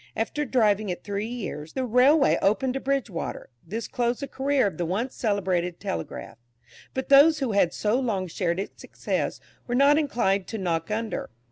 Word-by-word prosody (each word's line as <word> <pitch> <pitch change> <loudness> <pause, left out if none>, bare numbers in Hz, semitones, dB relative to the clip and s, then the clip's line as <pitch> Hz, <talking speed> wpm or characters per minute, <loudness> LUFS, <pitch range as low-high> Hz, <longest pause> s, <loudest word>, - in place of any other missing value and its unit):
After 295 +7 -1
driving 215 -5 +2
it 180 - -4
three 205 +1 -3
years, 200 -10 -6
the 260 - -1
railway 265 +5 +4
opened 250 +6 +2
to 270 - -2
Bridgewater; 265 - -3
this 220 +7 -5
closed 240 +1 -1
the 280 - -3
career 275 -1 +1
of 185 -5 -3
the 175 - 0
once 225 +9 -2
celebrated 185 -5 -1
"Telegraph." 80 +6 -5 0.6
But 265 - -3
those 290 +3 +7
who 265 -5 -1
had 200 -4 +3
so 215 +7 0
long 215 -8 -1
shared 170 0 -1
its 195 - -6
success, - - -3 0.3
were 245 - -1
not 285 +3 +5
inclined 200 -10 0
to 225 - -4
knock 165 -4 -2
under. 220 +1 -3
225 Hz, 175 wpm, -26 LUFS, 190-265 Hz, 0.6 s, those